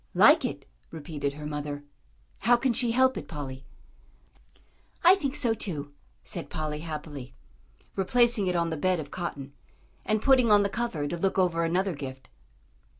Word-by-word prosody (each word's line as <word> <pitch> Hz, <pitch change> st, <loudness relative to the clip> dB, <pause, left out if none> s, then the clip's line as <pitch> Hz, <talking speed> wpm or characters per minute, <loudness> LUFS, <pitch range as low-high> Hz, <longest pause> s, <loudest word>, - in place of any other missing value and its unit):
"Like -, -, +7 dB
it?" -, -, -4 dB, 0.2 s
repeated 145 Hz, -3 st, -4 dB
her 150 Hz, +1 st, -8 dB
mother. 145 Hz, -1 st, -4 dB, 0.6 s
"How 240 Hz, +1 st, +4 dB
can 255 Hz, 0 st, +1 dB
she 240 Hz, +1 st, +1 dB
help 260 Hz, +2 st, +3 dB
it, -, -, -6 dB
Polly?" 135 Hz, -4 st, -7 dB, 1.4 s
"I 350 Hz, +2 st, +9 dB
think 290 Hz, -8 st, -1 dB
so 235 Hz, -3 st, +2 dB
too," 150 Hz, -10 st, -4 dB, 0.3 s
said -, -, -4 dB
Polly, 155 Hz, -1 st, -3 dB
happily, 150 Hz, -, -7 dB, 0.6 s
replacing 230 Hz, +1 st, +3 dB
it 180 Hz, -, 0 dB
on 170 Hz, -1 st, +1 dB
the 160 Hz, -, -2 dB
bed 185 Hz, +3 st, +1 dB
of 145 Hz, -2 st, -7 dB
cotton, 145 Hz, -6 st, -5 dB, 0.5 s
and 215 Hz, 0 st, +1 dB
putting 255 Hz, -1 st, +4 dB
on 205 Hz, -1 st, +6 dB
the 200 Hz, -, 0 dB
cover 195 Hz, -9 st, -2 dB
to 170 Hz, -, -3 dB
look 195 Hz, +2 st, 0 dB
over 175 Hz, -3 st, +2 dB
another 180 Hz, +3 st, +1 dB
gift. 135 Hz, -3 st, -8 dB
170 Hz, 160 wpm, -28 LUFS, 145-225 Hz, 1.4 s, I